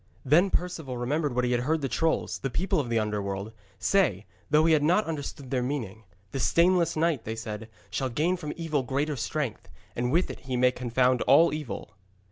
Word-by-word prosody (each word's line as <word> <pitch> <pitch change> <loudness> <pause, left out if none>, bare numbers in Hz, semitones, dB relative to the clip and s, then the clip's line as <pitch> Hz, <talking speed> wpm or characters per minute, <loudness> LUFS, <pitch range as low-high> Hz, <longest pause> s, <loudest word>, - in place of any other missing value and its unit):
Then 165 +8 +5
Perceval 165 -9 -2
remembered 140 +2 -1
what 125 0 +2
he 125 - 0
had 120 -1 +1
heard 155 +5 0
the 135 - 0
trolls 160 +4 0
the 135 - -2
people 185 +6 0
of 130 -5 -2
the 115 - +1
Underworld 105 -1 -2 0.2
say, 105 - +2 0.2
though 155 +1 +4
he 165 - +5
had 155 - +4
not 180 +8 +3
understood 145 -4 -5
their 130 -2 +1
meaning. 115 -5 -4 0.3
'The 135 - -3
stainless 170 +3 +3
knight,' 160 -6 +1
they 110 - -4
said, 110 -1 -6 0.2
'shall 135 -1 -1
gain 155 +9 +1
from 155 -5 -5
evil 160 -4 -1
greater 140 +4 -1
strength, 140 -3 -3 0.3
and 125 +1 -1
with 170 +5 +2
it - - -10
he 130 -1 -3
may 125 0 +4
confound 125 0 +1
all 155 +5 +6
evil.' 150 -8 -6
135 Hz, 200 wpm, -27 LUFS, 120-160 Hz, 0.3 s, all